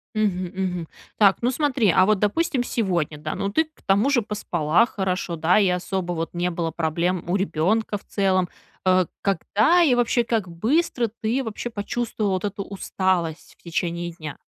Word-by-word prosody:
Мгм, 200 Hz, -4 st, +1 dB
мгм. 180 Hz, -3 st, -2 dB, 0.3 s
Так, 200 Hz, -3 st, +6 dB
ну 240 Hz, -, +2 dB
смотри, 265 Hz, -, +2 dB
а 185 Hz, -, +7 dB
вот, 210 Hz, +1 st, +3 dB
допустим, 255 Hz, -, +1 dB
сегодня, 175 Hz, -11 st, -1 dB
да, 150 Hz, -, -4 dB
ну, 200 Hz, -, -1 dB
ты 320 Hz, +9 st, +3 dB
к 315 Hz, -, -29 dB
тому 200 Hz, +8 st, +3 dB
же 250 Hz, -5 st, +3 dB
поспала 180 Hz, -3 st, +1 dB
хорошо, 185 Hz, -5 st, -2 dB
да, 165 Hz, +5 st, +3 dB
и 200 Hz, -, +3 dB
особо, 180 Hz, 0 st, -2 dB
вот, 165 Hz, +1 st, -4 dB
не 175 Hz, +1 st, 0 dB
было 170 Hz, -1 st, -2 dB
проблем 170 Hz, +2 st, -1 dB
у 180 Hz, -, +2 dB
ребенка 200 Hz, +4 st, 0 dB
в 200 Hz, -, -11 dB
целом. 190 Hz, -3 st, +1 dB, 0.4 s
Э, 185 Hz, -2 st, +4 dB, 0.2 s
когда 210 Hz, -, +3 dB
и 290 Hz, -7 st, +4 dB
вообще, 240 Hz, 0 st, +2 dB
как 225 Hz, -5 st, -1 dB
быстро 235 Hz, -, 0 dB
ты 240 Hz, +5 st, 0 dB
вообще 225 Hz, +2 st, -5 dB
почувствовала 215 Hz, -1 st, -2 dB
вот 185 Hz, +1 st, -2 dB
эту 200 Hz, 0 st, -3 dB
усталость 185 Hz, -4 st, -2 dB
в -, -, -30 dB
течение 170 Hz, 0 st, -2 dB
дня? 155 Hz, -4 st, -8 dB
195 Hz, 180 wpm, -23 LUFS, 175-225 Hz, 0.4 s, а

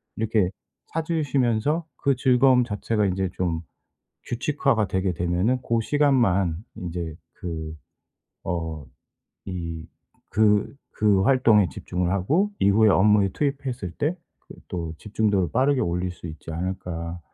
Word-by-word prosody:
이렇게 110 Hz, -4 st, +1 dB, 0.4 s
찾으시면서, 150 Hz, -2 st, 0 dB
그 140 Hz, -1 st, +1 dB
즐거움 130 Hz, 0 st, +4 dB
자체가 105 Hz, -1 st, -1 dB
인제 95 Hz, 0 st, 0 dB
좀 85 Hz, -3 st, -1 dB, 0.6 s
규칙화가 120 Hz, -4 st, 0 dB
되게 95 Hz, -1 st, 0 dB
되면은 90 Hz, +9 st, 0 dB
고 115 Hz, 0 st, 0 dB
시간만 115 Hz, -, +2 dB, 0.2 s
인제 85 Hz, -2 st, -5 dB, 0.2 s
그 80 Hz, -3 st, -6 dB, 0.7 s
어, 80 Hz, -5 st, -3 dB, 0.6 s
이 85 Hz, -3 st, -5 dB, 0.4 s
그 105 Hz, +4 st, +2 dB, 0.2 s
그 100 Hz, -3 st, +4 dB
활동에 110 Hz, -6 st, +4 dB
집중을 90 Hz, 0 st, -2 dB
하고 145 Hz, -, +1 dB
이후에 105 Hz, +2 st, +5 dB
업무에 100 Hz, 0 st, +4 dB
투입했을 135 Hz, -, -3 dB
때 150 Hz, -, -1 dB, 0.3 s
그 -, -, -10 dB
또 85 Hz, -3 st, -4 dB
집중도를 105 Hz, -4 st, 0 dB
빠르게 135 Hz, +2 st, +2 dB
올릴 90 Hz, +1 st, -1 dB
수 90 Hz, -, -10 dB
있지 80 Hz, 0 st, -8 dB
않을까.' 85 Hz, -1 st, -4 dB
100 Hz, 255 characters per minute, -24 LUFS, 90-125 Hz, 0.7 s, 이후에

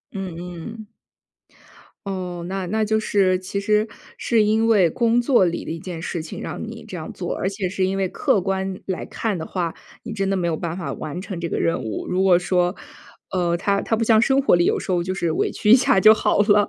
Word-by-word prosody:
嗯 190 Hz, -3 st, -5 dB
嗯。 180 Hz, +5 st, -8 dB, 1.2 s
哦， 180 Hz, -3 st, -4 dB
那 190 Hz, -1 st, -3 dB
那 220 Hz, +3 st, 0 dB
就 220 Hz, +1 st, +1 dB
是 190 Hz, -4 st, +2 dB
其 190 Hz, +2 st, -4 dB
实 210 Hz, +2 st, +2 dB, 0.3 s
是 225 Hz, -3 st, +2 dB
因 220 Hz, +2 st, +2 dB
为 200 Hz, -7 st, +5 dB
工 235 Hz, +7 st, +2 dB
作 240 Hz, -5 st, +4 dB
里 170 Hz, -1 st, -2 dB
的 -, -, -6 dB
一 165 Hz, -, -5 dB
件 175 Hz, -2 st, -7 dB
事 170 Hz, 0 st, -3 dB
情 155 Hz, -, -8 dB
让 -, -, -5 dB
你 -, -, -7 dB
这 -, -, -7 dB
样 -, -, -6 dB
做， -, -, -4 dB
而 -, -, -2 dB
且 195 Hz, -2 st, -3 dB
是 190 Hz, 0 st, 0 dB
因 190 Hz, +1 st, -1 dB
为 190 Hz, -2 st, 0 dB
客 200 Hz, -, +1 dB
观 190 Hz, 0 st, -2 dB
来 185 Hz, -2 st, -3 dB
看 215 Hz, -5 st, -2 dB
的 160 Hz, -, -5 dB
话， 175 Hz, -3 st, -2 dB, 0.3 s
你 235 Hz, -, -7 dB
真 195 Hz, -3 st, -1 dB
的 195 Hz, -, +1 dB
没 180 Hz, -2 st, -1 dB
有 165 Hz, -2 st, -1 dB
办 170 Hz, 0 st, -4 dB
法 180 Hz, -, -4 dB
完 160 Hz, +4 st, -6 dB
成 190 Hz, -2 st, -6 dB
这 170 Hz, -, -2 dB
个 -, -, -3 dB
任 165 Hz, -5 st, 0 dB
务。 110 Hz, -2 st, -4 dB
如 180 Hz, +1 st, +1 dB
果 185 Hz, -2 st, +5 dB
说， 180 Hz, +1 st, +1 dB, 0.6 s
呃， 175 Hz, -2 st, +1 dB
它 200 Hz, +3 st, 0 dB
它 225 Hz, -, 0 dB
不 225 Hz, -, 0 dB
像 220 Hz, -1 st, +5 dB
生 270 Hz, +3 st, +3 dB
活 275 Hz, -, +3 dB
里， 175 Hz, -, +3 dB
有 -, -, +2 dB
时 -, -, -4 dB
候 175 Hz, -1 st, +2 dB
就 185 Hz, +2 st, -2 dB
是 170 Hz, -3 st, -1 dB
委 -, -, 0 dB
屈 210 Hz, -, +1 dB
一 -, -, +11 dB
下 250 Hz, -6 st, +3 dB
就 215 Hz, +3 st, +9 dB
好 220 Hz, -, +1 dB
了， 205 Hz, 0 st, +4 dB
190 Hz, 260 characters per minute, -22 LUFS, 175-215 Hz, 1.2 s, 一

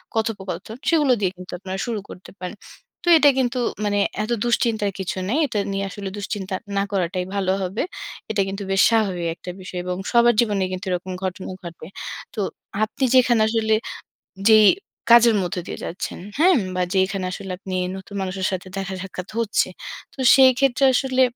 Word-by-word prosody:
কথোপকথন, 220 Hz, -1 st, -3 dB
সেগুলো 300 Hz, -5 st, +4 dB
দিয়ে 190 Hz, -3 st, +1 dB
কিন্তু 180 Hz, 0 st, -10 dB
আপনারা 190 Hz, 0 st, -5 dB
শুরু 230 Hz, -3 st, -2 dB
করতে 185 Hz, -, -11 dB
পারেন। 185 Hz, +3 st, -6 dB, 0.5 s
তো -, -, -9 dB
এটা 290 Hz, -2 st, +6 dB
কিন্তু 250 Hz, -1 st, 0 dB, 0.3 s
মানে 205 Hz, 0 st, +1 dB, 0.2 s
এত 230 Hz, -, -4 dB
দুশ্চিন্তার 230 Hz, -4 st, +1 dB
কিছু 190 Hz, 0 st, -3 dB
নেই। 285 Hz, -, +1 dB
এটা 220 Hz, -5 st, -2 dB
নিয়ে 195 Hz, 0 st, -1 dB
আসলে 200 Hz, 0 st, -6 dB
দুশ্চিন্তা 200 Hz, -2 st, -4 dB, 0.2 s
না 195 Hz, -, +3 dB
করাটাই 185 Hz, -1 st, -1 dB
ভালো 190 Hz, -2 st, +1 dB
হবে। 190 Hz, +3 st, -2 dB, 0.5 s
এটা 205 Hz, -, +1 dB
কিন্তু 195 Hz, +1 st, -4 dB
বেশ 195 Hz, 0 st, +4 dB
স্বাভাবিক 195 Hz, -7 st, +1 dB
একটা 180 Hz, -, -10 dB
বিষয়। 185 Hz, -1 st, -6 dB
এবং 180 Hz, 0 st, -2 dB, 0.2 s
সবার 240 Hz, 0 st, +5 dB
জীবনেই 205 Hz, -5 st, +1 dB
কিন্তু 185 Hz, +2 st, -5 dB
এরকম 180 Hz, +1 st, -3 dB
ঘটনা 185 Hz, 0 st, -4 dB, 0.2 s
ঘটবে। 170 Hz, -2 st, -9 dB, 0.5 s
তো -, -, -6 dB, 0.4 s
আপনি 215 Hz, +5 st, -2 dB
যেখানে 240 Hz, -3 st, +5 dB
আসলে 220 Hz, -1 st, +1 dB, 0.8 s
যেই 215 Hz, -1 st, +8 dB, 0.4 s
কাজের 235 Hz, -1 st, +8 dB
মধ্যে 180 Hz, 0 st, -3 dB
দিয়ে -, -, -6 dB
যাচ্ছেন, 175 Hz, -, -5 dB, 0.2 s
হ্যাঁ? 355 Hz, +3 st, +5 dB, 0.2 s
বা 185 Hz, -, 0 dB
যেখানে 190 Hz, 0 st, +1 dB
আসলে 195 Hz, 0 st, -6 dB
আপনি 190 Hz, -1 st, -5 dB, 0.2 s
নতুন 190 Hz, +1 st, -10 dB
মানুষের 190 Hz, 0 st, -2 dB
সাথে 185 Hz, 0 st, -4 dB
দেখা-সাক্ষাৎ 190 Hz, -1 st, -5 dB
হচ্ছে, 230 Hz, -2 st, +1 dB, 0.5 s
তো -, -, -19 dB
সেই 265 Hz, -1 st, +8 dB
ক্ষেত্রে 275 Hz, -1 st, +2 dB
আসলে 260 Hz, 0 st, +2 dB
200 Hz, 170 wpm, -22 LUFS, 185-230 Hz, 0.8 s, যেই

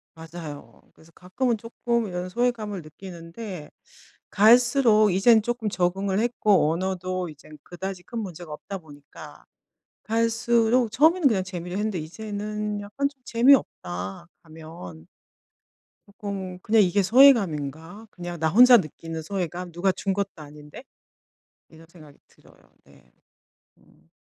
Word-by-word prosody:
맞아요. 160 Hz, -2 st, -10 dB
그래서 165 Hz, +1 st, -21 dB
가끔은 225 Hz, +6 st, -2 dB
쪼끔 235 Hz, 0 st, -2 dB
이런 180 Hz, 0 st, -5 dB
소외감을 220 Hz, -3 st, -2 dB
느끼는데 170 Hz, +1 st, -9 dB, 0.6 s
갈수록 230 Hz, -1 st, +5 dB
이젠 220 Hz, +5 st, +5 dB
쪼끔 230 Hz, -1 st, -3 dB
적응을 190 Hz, +2 st, -1 dB
했고 210 Hz, -8 st, +2 dB
언어도 185 Hz, 0 st, -3 dB
이젠 150 Hz, +1 st, -15 dB
그다지 185 Hz, +1 st, -7 dB
큰 235 Hz, +6 st, -7 dB
문제가 175 Hz, -6 st, -7 dB
없다 195 Hz, +6 st, -7 dB
보니까 145 Hz, -5 st, -14 dB, 0.6 s
갈수록 230 Hz, +1 st, +1 dB
처음에는 315 Hz, +4 st, +4 dB
그냥 190 Hz, -5 st, 0 dB
재미로 180 Hz, -1 st, -6 dB
했는데 210 Hz, -2 st, -2 dB
이제는 210 Hz, +4 st, -5 dB
약간 275 Hz, +8 st, -2 dB
좀 275 Hz, -, -28 dB
'재미없다.' 95 Hz, -, +1 dB, 0.2 s
가면. 155 Hz, -, -12 dB, 1.0 s
쪼끔 195 Hz, -2 st, -7 dB
그냥 215 Hz, +3 st, +3 dB
'이게 185 Hz, +3 st, +2 dB
소외감인가? 190 Hz, -, +3 dB
그냥 175 Hz, -2 st, -7 dB
나 160 Hz, -, +1 dB
혼자 245 Hz, +6 st, +8 dB
느끼는 165 Hz, -1 st, -5 dB
소외감? 180 Hz, 0 st, -4 dB
누가 175 Hz, +3 st, +1 dB
준 190 Hz, +1 st, -2 dB
것도 195 Hz, -5 st, -4 dB
아닌데.' 150 Hz, -, -12 dB, 0.9 s
이런 160 Hz, 0 st, -17 dB
생각이 155 Hz, -4 st, -17 dB
들어요. -, -, -23 dB, 0.3 s
네. 70 Hz, -3 st, -23 dB, 0.7 s
음. -, -, -27 dB
190 Hz, 290 characters per minute, -24 LUFS, 165-225 Hz, 1.0 s, 혼자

